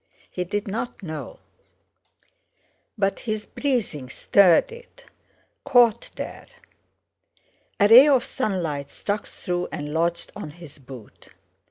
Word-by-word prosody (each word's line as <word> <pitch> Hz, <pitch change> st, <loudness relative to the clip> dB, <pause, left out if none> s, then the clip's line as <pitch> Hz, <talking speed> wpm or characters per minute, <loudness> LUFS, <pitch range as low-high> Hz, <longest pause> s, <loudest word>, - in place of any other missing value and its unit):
He 180 Hz, -, -3 dB
did 205 Hz, +3 st, -3 dB
not 220 Hz, +2 st, -5 dB
know; 160 Hz, -, -7 dB, 1.6 s
but 195 Hz, -1 st, 0 dB
his 215 Hz, -2 st, -4 dB
breathing 220 Hz, -, -2 dB
stirred 185 Hz, -, +4 dB
it, 485 Hz, +1 st, -14 dB, 0.6 s
caught 235 Hz, -3 st, +3 dB
there. -, -, -7 dB, 1.3 s
A 205 Hz, -, +5 dB
ray 245 Hz, +6 st, +9 dB
of 270 Hz, -4 st, +3 dB
sunlight 165 Hz, -, -3 dB
struck 205 Hz, +1 st, -4 dB
through 180 Hz, -1 st, -3 dB
and 150 Hz, 0 st, -5 dB
lodged 170 Hz, +1 st, -1 dB
on 155 Hz, -, -7 dB
his 155 Hz, -2 st, -13 dB
boot. 130 Hz, -4 st, -13 dB
195 Hz, 115 wpm, -24 LUFS, 160-230 Hz, 1.6 s, ray